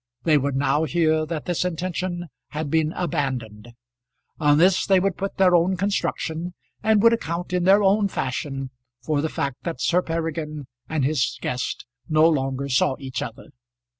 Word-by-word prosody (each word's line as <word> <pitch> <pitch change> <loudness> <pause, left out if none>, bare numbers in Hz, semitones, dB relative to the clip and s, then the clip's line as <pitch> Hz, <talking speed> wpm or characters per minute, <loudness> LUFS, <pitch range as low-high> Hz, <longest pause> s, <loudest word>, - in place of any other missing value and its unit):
They 155 -3 +4
would 140 0 -1
now 145 +3 +2
hear 155 0 +1
that 155 -2 -4
this 175 -1 0
intention 175 0 -3 0.2
had 150 -1 -4
been 160 -1 +2
abandoned. 125 - -3 0.7
On 145 -1 +4
this 180 +3 +4
they 190 -2 +5
would 190 -1 0
put 195 +1 -4
their 185 -2 +5
own 175 +2 +3
construction, 175 -3 -2 0.3
and 215 -1 +3
would 230 0 +7
account 175 -4 -3
in 180 -1 +1
their 200 +2 +6
own 200 +1 +3
fashion 135 -3 -3 0.3
for 150 -2 0
the 160 - -1
fact 140 -4 -3
that 170 -2 -4
Sir 180 +1 +2
Peregrine 160 -3 -3 0.2
and 155 -4 0
his 140 -3 0
guest 125 - -3 0.2
no 155 +1 +5
longer 135 -3 0
saw 130 0 +2
each 130 -1 -5
other. 115 - -7
160 Hz, 165 wpm, -23 LUFS, 140-180 Hz, 0.7 s, would